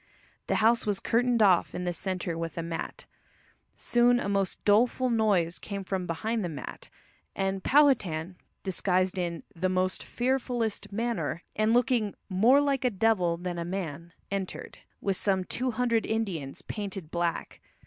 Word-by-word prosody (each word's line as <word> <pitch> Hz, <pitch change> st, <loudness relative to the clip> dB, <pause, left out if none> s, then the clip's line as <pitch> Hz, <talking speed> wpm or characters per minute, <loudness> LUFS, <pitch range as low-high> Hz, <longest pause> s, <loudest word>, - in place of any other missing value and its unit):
The -, -, +1 dB
house 230 Hz, +1 st, +3 dB
was 205 Hz, -2 st, +1 dB
curtained 240 Hz, -1 st, +2 dB
off 185 Hz, -4 st, +4 dB
in 180 Hz, -, -3 dB
the 175 Hz, -1 st, -1 dB
centre 180 Hz, -1 st, -3 dB
with 165 Hz, -1 st, -5 dB
a 170 Hz, -, -2 dB
mat. 165 Hz, 0 st, -5 dB, 0.7 s
Soon 245 Hz, 0 st, +3 dB
a -, -, -3 dB
most 195 Hz, -1 st, -1 dB
doleful 240 Hz, +4 st, +3 dB
noise 200 Hz, -7 st, +2 dB
came 200 Hz, -1 st, -5 dB
from 185 Hz, -1 st, -3 dB
behind 215 Hz, +7 st, -1 dB
the 175 Hz, -, -2 dB
mat, 155 Hz, -, -8 dB, 0.5 s
and 195 Hz, 0 st, -1 dB
Powhatan, 195 Hz, -, +3 dB, 0.3 s
disguised 185 Hz, 0 st, +1 dB
in 170 Hz, -2 st, -3 dB
"the 185 Hz, +2 st, 0 dB
most 185 Hz, 0 st, 0 dB
fearfullest 245 Hz, -4 st, -1 dB
manner," 230 Hz, -5 st, -2 dB
and 215 Hz, +1 st, +2 dB
looking 235 Hz, -3 st, +2 dB
"more 225 Hz, +9 st, +5 dB
like 280 Hz, -2 st, +1 dB
a 250 Hz, -, +3 dB
devil 190 Hz, -5 st, +2 dB
than 175 Hz, 0 st, -4 dB
a -, -, -2 dB
man," 170 Hz, -2 st, -5 dB, 0.2 s
entered, 195 Hz, -2 st, -4 dB, 0.2 s
with 195 Hz, -2 st, 0 dB
some 190 Hz, -2 st, +1 dB
two 255 Hz, +7 st, -2 dB
hundred 235 Hz, -1 st, +1 dB
Indians, 190 Hz, -11 st, -3 dB
painted 195 Hz, -6 st, -6 dB
black. 170 Hz, -1 st, -2 dB
195 Hz, 155 wpm, -28 LUFS, 175-230 Hz, 0.7 s, more